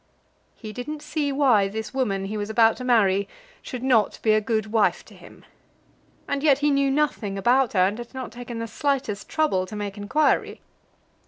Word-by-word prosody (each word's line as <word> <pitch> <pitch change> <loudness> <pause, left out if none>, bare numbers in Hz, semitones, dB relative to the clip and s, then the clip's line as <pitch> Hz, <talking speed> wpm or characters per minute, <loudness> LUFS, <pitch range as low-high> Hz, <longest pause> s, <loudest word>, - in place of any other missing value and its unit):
He 215 -2 -9
didn't 295 +5 -6
see 295 -3 -2
why 255 -8 +3
this 220 +4 -6
woman 200 -8 -1
he 205 +2 -5
was 205 0 -3
about 225 0 +4
to 255 - -7
marry 200 -5 +3 0.3
should 250 -2 -7
not 235 -6 +2
be 220 - +3
a 215 - +3
good 215 -1 -2
wife 220 -2 +1
to - - -16
him! - - -16 0.8
And 280 0 -2
yet 285 -3 +4
he 295 +1 +1
knew 275 0 +2
nothing 270 -8 -1
about 245 +5 +2
her, 185 -2 +4
and 205 +4 -2
had 240 0 -8
not 260 -1 -7
taken 240 -1 -8
the 230 - -3
slightest 230 -3 -2
trouble 195 -13 0
to 210 - -8
make 205 -1 -5
inquiry. 295 +10 0
230 Hz, 190 wpm, -24 LUFS, 210-270 Hz, 0.8 s, about